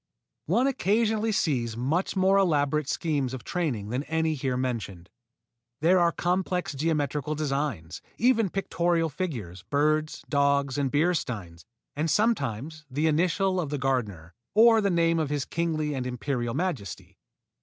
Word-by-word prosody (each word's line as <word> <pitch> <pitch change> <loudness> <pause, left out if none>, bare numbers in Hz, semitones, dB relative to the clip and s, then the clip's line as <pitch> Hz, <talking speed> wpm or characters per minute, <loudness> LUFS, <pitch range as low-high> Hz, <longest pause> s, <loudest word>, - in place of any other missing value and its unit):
One 225 - +2
occasionally 220 -3 +1
sees 125 - 0
much 155 +13 -1
more 190 +1 +4
elaborate 150 -5 +1
schemes 140 -6 -1
of 125 - -9
training 135 - -2
than 125 +4 -1
any 160 0 0
here 130 -3 -2
mentioned. 105 -8 -4 0.7
There 180 +4 +4
are 170 -1 +4
complex 180 -1 -1
geometrical 150 0 -1
designs, 140 - -3 0.2
even 230 -3 +3
pictorial 170 -3 0
figures 115 - -5
birds, 155 - 0
dogs, 140 -1 +1
and 140 -2 +1
beer 155 +6 +2
steins 95 - -5 0.3
and 155 +3 -1
sometimes 155 - 0
the 145 +4 -1
initials 180 +4 +2
of 155 - -4
the 145 - -2
gardener, 105 - -2 0.2
or 225 0 +6
the 200 - +1
name 165 -2 +2
of 155 -3 -1
his 145 -2 -1
kingly 155 -3 -1
and 130 -2 -3
imperial 125 -1 -2
majesty. 145 - -4
150 Hz, 145 wpm, -27 LUFS, 130-175 Hz, 0.7 s, or